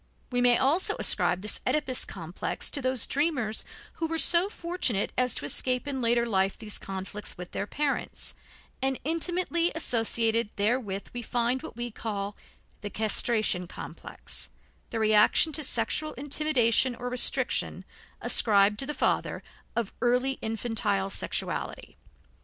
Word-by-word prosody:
We 245 0 0
may 245 -1 +5
also 285 +8 +3
ascribe 180 +2 +3
this 210 - 0
Oedipus 280 -4 0
complex 170 -1 -3
to 285 - +1
those 255 -3 +3
dreamers 270 -7 -1 0.3
who 325 - -2
were 325 0 -3
so 340 +4 +4
fortunate 340 - -1
as 250 -2 0
to - - -4
escape 250 - +3
in 270 -2 -3
later 235 0 +2
life 195 -3 0
these 215 -2 -2
conflicts 195 +2 -3
with 180 0 -9
their 200 - -4
parents, 290 +3 -3 0.5
and 265 0 -1
intimately 340 +2 +1
associated 230 -5 +2
therewith 205 -2 -2
we 245 - -5
find 240 +2 -1
what - - -10
we 240 0 -5
call 205 -2 -4 0.5
the 205 - -5
castration 215 -3 +1
complex, - - -5 0.4
the 230 - -4
reaction 215 +7 +4
to 310 +1 -1
sexual 270 +5 0
intimidation 265 -4 +2
or 245 +1 -6
restriction, 250 0 +1 0.4
ascribed 210 -1 +4
to 270 - 0
the 300 - -3
father, - - -1 0.3
of 235 -4 -2
early 250 +2 +1
infantile 215 -3 -2
sexuality. - - -3
240 Hz, 140 wpm, -27 LUFS, 210-270 Hz, 0.5 s, may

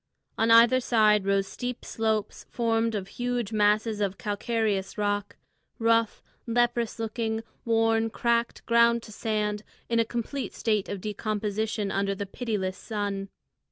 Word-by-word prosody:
On 225 +1 +1
either 230 +3 +7
side 215 -5 +3
rose 195 0 +2
steep 245 +5 -5
slopes 220 -2 -2
formed 230 -1 0
of 195 -2 -3
huge 245 -1 -3
masses 210 +1 +2
of 195 -1 -1
calcareous 210 -2 -1
rock, 205 -1 -1 0.4
rough, 230 -1 +2 0.2
leprous 235 0 +1
looking, 225 0 -2 0.2
worn, 225 -1 +2
cracked, 235 +1 0
ground 235 0 +4
to 215 - -11
sand, 210 -1 -1 0.3
in 230 0 +2
a - - +5
complete 240 +4 -4
state 215 -3 0
of 200 -2 -4
decomposition 215 0 -2
under 195 0 0
the 200 - -4
pitiless 195 -3 -3
sun. 200 -3 -3
220 Hz, 135 wpm, -27 LUFS, 205-230 Hz, 0.4 s, either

